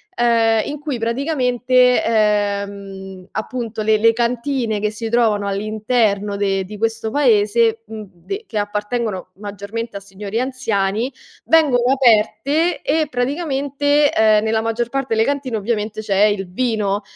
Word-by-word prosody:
ehm, 230 -2 +3
in 295 - -5
cui 290 -5 -4
praticamente, 250 0 +2
ehm, 200 -3 -1
appunto 225 -1 -4
le 215 0 +3
le 225 +2 +4
cantine 235 -1 -1
che 210 0 -1
si 225 +1 -5
trovano 220 -4 +2
all'interno 210 0 0
de 195 -1 0
di 210 +3 -9
questo 225 +1 -2
paese, 225 -3 +2
mhmm, 220 -1 -8
de 390 - -7
che 215 - -3
appartengono 210 -1 -3
maggiormente 205 +2 -6
a - - -6
signori 200 +2 -5
anziani, 235 -3 -1 0.3
vengono 265 -6 +3
aperte 275 +6 +2
e 310 +1 +1
praticamente, 285 +1 0
ehm, 215 -3 +4
nella 220 0 +1
maggior 230 +1 -2
parte 270 -3 -2
le 220 - +3
cantine 275 -5 -2
ovviamente 215 0 -2
c'è 205 -1 +2
il 205 -3 0
vino 210 -2 -1
225 Hz, 135 wpm, -19 LUFS, 205-250 Hz, 0.3 s, le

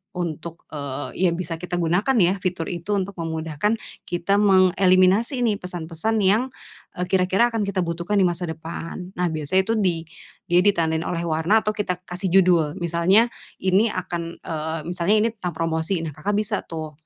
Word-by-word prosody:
untuk, 170 -1 -5
eee, 145 +4 -4
ya - - +4
bisa 170 -1 -3
kita 175 +2 -5
gunakan 180 +10 +1
ya 180 0 +4
fitur 180 -4 -3
itu 175 +3 -4
untuk 195 +1 -4
memudahkan 165 +5 -2 0.2
kita 175 +3 0
mengeliminasi 190 +3 +4
nih 230 -4 +2
pesan-pesan 180 +3 -3
yang, 215 +6 +2 0.5
eee, 180 - -1
kira-kira 190 +5 +3
akan 225 -3 -1
kita 200 -1 -2
butuhkan 175 +3 -1
di 185 - +5
masa 175 +1 -3
depan. 165 +3 -6
Nah, 180 0 0
biasanya 155 +5 +1
itu, 225 - +2 0.8
dia 175 - +6
ditandain 165 -5 +2
oleh 170 -1 -2
warna 170 +7 +2
atau 215 - +1
kita 185 -4 -3
kasih 180 +1 -4
judul. 175 -4 +4
Misalnya 175 +7 +3 0.3
ini 190 +4 +4
akan, 175 -4 -4
eee, 160 0 -3
misalnya 180 +4 +2
ini 215 +2 +3
tentang 180 -5 -4
promosi. 165 +2 -1
Nah, 160 - -4
Kakak 155 +8 -2
bisa 210 0 0
tuh, 160 -2 -5
180 Hz, 165 wpm, -23 LUFS, 165-200 Hz, 0.8 s, dia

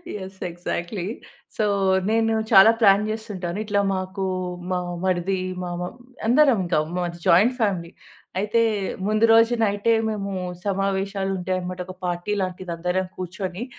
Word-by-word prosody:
Yes. 190 -1 -8
Exactly. 175 +2 -4 0.5
So, 215 - +1 0.5
నేను 225 0 +2 0.2
చాలా 200 +2 +9
plan 200 0 +6
చేస్తుంటాను. 195 -5 -5
ఇట్లా 205 -1 +1
మాకు 185 +1 -4 0.5
మా 180 - +1 0.3
మరిది 185 +1 0 0.2
మ - - -3 0.2
మ - - -1 0.4
అందరం 265 -1 +5
ఇంకా 170 -3 +1 0.2
మాది 175 -1 -3
జాయింట్ 215 +9 +5
ఫ్యామిలీ. 185 -6 0 0.5
అయితే, 215 +3 +2 0.5
ముందు 215 +1 +3
రోజు 230 +1 +5
నైటే 205 +2 +2 0.2
మేము 200 -2 -3 0.3
సమావేశాలుంటాయనమాట. 190 -2 -1
ఒక 185 - -8
పార్టీ 175 +4 -2
లాంటిది. 185 -1 -4
అందరం 180 +2 -1
కూర్చొని, 185 +3 -5
195 Hz, 125 wpm, -23 LUFS, 180-210 Hz, 0.5 s, చాలా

